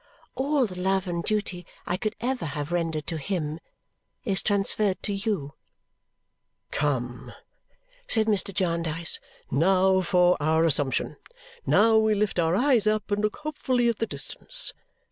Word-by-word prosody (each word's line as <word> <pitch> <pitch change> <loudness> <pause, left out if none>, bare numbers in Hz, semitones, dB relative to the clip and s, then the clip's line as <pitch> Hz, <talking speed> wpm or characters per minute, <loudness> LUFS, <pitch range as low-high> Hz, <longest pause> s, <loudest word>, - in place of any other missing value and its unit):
All 275 0 +1
the 185 -4 -7
love 190 +1 0
and 170 -1 -2
duty 200 -4 -2 0.2
I 175 - -1
could 215 +3 -3
ever 250 -4 -2
have 145 +1 -4
rendered 165 -3 -1
to 165 0 -4
him 155 -2 -3 0.7
is 195 -4 +2
transferred 200 -1 +1
to 205 - -2
you." 195 -8 -2 1.2
"Come!" 125 -4 -2 0.7
said 220 -2 +2
Mr. 205 -2 +1
Jarndyce. 170 -3 0 0.3
"Now 190 +5 +3
for 180 0 +3
our 160 +2 +2
assumption. 145 -4 +1 0.5
Now 220 +1 +5
we 220 -1 +3
lift 205 -3 0
our 165 +1 +2
eyes 245 -2 +3
up 215 0 0
and 205 0 +1
look 215 0 0
hopefully 260 -5 0
at 230 - -2
the 225 - 0
distance! - - -2
190 Hz, 145 wpm, -26 LUFS, 165-215 Hz, 1.2 s, Now